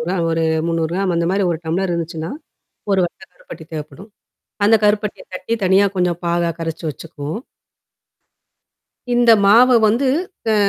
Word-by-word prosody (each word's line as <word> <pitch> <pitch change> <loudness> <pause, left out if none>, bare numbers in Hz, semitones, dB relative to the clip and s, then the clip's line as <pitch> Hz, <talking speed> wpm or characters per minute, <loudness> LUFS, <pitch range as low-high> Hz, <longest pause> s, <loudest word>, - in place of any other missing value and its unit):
ஒரா 175 +4 -2 0.2
ஒரு 165 0 0 0.2
300கிராம் 170 +3 -1
அந்த 170 0 0
மாரி 195 +1 +1
ஒரு 165 - -2
டம்ளர் 175 +3 -1
இருந்துச்சுன்னா. 165 0 -4 0.6
ஒரு 190 - +3
வட்டக்கருப்பட்டி 425 - -12
தேவைப்படும். 160 +7 -8 0.6
அந்த 225 - +5
கருப்பட்டிய 210 0 0
தட்டி 185 +5 -3
தனியா 190 +2 +4
கொஞ்சம் 180 -1 0
பாகா 170 0 +1
கரச்சு 165 0 -5
வச்சுக்குவோம். 155 - -7 1.8
இந்த 240 -1 +4 0.2
மாவ 235 +5 +7 0.2
வந்து 245 +6 +1 0.5
அ - - +3
180 Hz, 130 wpm, -19 LUFS, 165-205 Hz, 1.8 s, மாவ